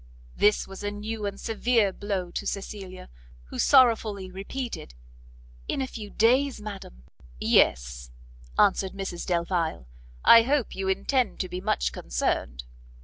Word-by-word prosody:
This 210 0 +3
was 195 +1 -9
a 205 - -1
new 210 +1 -4
and 200 0 -6
severe 225 -2 +1
blow 195 -4 -3
to - - -4
Cecilia, 195 -2 -6 0.4
who - - -7
sorrowfully 220 -8 +4
repeated 195 - -6 0.7
"In - - -2
a 265 - 0
few 220 -5 -8
days, 255 +5 +2
madam?" 195 - -9 0.4
"Yes," 60 0 +2 0.5
answered 195 -2 +3
Mrs 195 -3 -5
Delvile, 170 - -1 0.4
"I 230 - +9
hope 265 +1 0
you 190 0 -3
intend 210 +6 0
to 185 - -4
be 180 +1 -5
much 60 - 0
concerned?" - - -2
200 Hz, 135 wpm, -26 LUFS, 180-225 Hz, 0.7 s, I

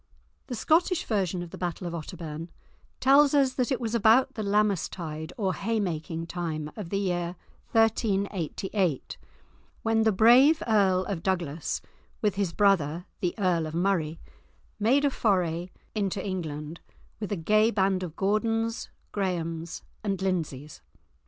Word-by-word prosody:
The 250 - -4
Scottish 330 - +2
version 190 -5 -1
of 170 - -10
the - - -9
battle 175 0 -3
of 170 - -4
Otterbourne 165 -1 -6 0.5
tells 280 +2 +5
us 270 -2 +4
that 255 +1 -1
it 260 - +1
was 230 -2 -3
about 230 +3 +4
the 220 - -4
Lammas 205 -2 +1
tide 160 -2 -6
or 195 -5 0
haymaking 175 -7 -2
time 160 -3 -4
of 205 -6 -6
the 195 - -1
year 175 -3 -1 0.4
1388 195 - 0 0.7
when 225 0 +2
the 220 0 +4
brave 245 +10 +6
Earl 195 -4 +3
of 195 -5 -3
Douglas, 170 -5 -2 0.4
with 210 -3 +1
his 195 -3 -1
brother, 175 -4 +2
the 175 -2 -1
Earl 175 -5 +1
of 155 - -6
Murray, 170 -3 0 0.6
made 260 +7 +3
a 280 - +3
foray 180 -7 0 0.2
into 200 -2 -1
England, 160 -4 -4 0.4
with 210 -1 -5
a - - +1
gay 215 +6 +3
band 190 -3 +1
of 175 -3 -5
Gordons, 225 +4 0 0.2
Graemes, 170 -4 -3 0.2
and 195 -3 -1
Lindsays. 160 -7 -3
190 Hz, 145 wpm, -27 LUFS, 170-220 Hz, 0.7 s, brave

